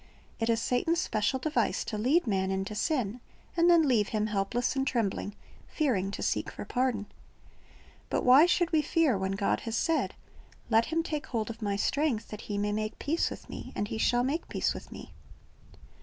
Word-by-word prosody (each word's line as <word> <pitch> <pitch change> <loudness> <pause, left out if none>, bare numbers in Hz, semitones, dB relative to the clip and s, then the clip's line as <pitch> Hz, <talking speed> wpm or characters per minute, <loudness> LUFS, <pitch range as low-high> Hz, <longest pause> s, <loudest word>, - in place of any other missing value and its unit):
It 225 0 0
is 225 -1 +3
Satan's 325 +9 +1
special 215 -2 0
device 305 +4 0
to 220 - -4
lead 265 +11 +2
man 190 -4 0
into 195 +2 -2
sin, 240 -1 -1 0.4
and 340 0 +4
then 335 -3 +6
leave 220 -6 +3
him, 215 -1 -1
helpless 215 +5 -1
and 270 0 0
trembling, 205 -3 -1 0.3
fearing 230 - 0
to 200 - -5
seek - - 0
for - - -8
pardon. 245 -5 0 1.0
But - - -1
why 265 +7 +8
should 350 -1 +2
we 315 -2 +4
fear, 305 -5 +2
when 190 0 -1
God 200 +1 0
has 225 0 -3
said, 325 -1 0 0.6
"Let 225 +1 +5
him 330 +1 0
take 305 -2 -4
hold 230 -2 -2
of 230 +1 -11
My 205 -2 0
strength, 275 +2 0
that 210 - -7
he 205 - -4
may 205 0 0
make 215 +1 -2
peace 320 +4 0
with - - -9
Me; - - -8
and 205 - -2
he 220 - -3
shall 245 +1 +3
make 290 +6 -2
peace - - 0
with - - -10
Me"? - - -10
230 Hz, 195 wpm, -29 LUFS, 210-295 Hz, 1.0 s, why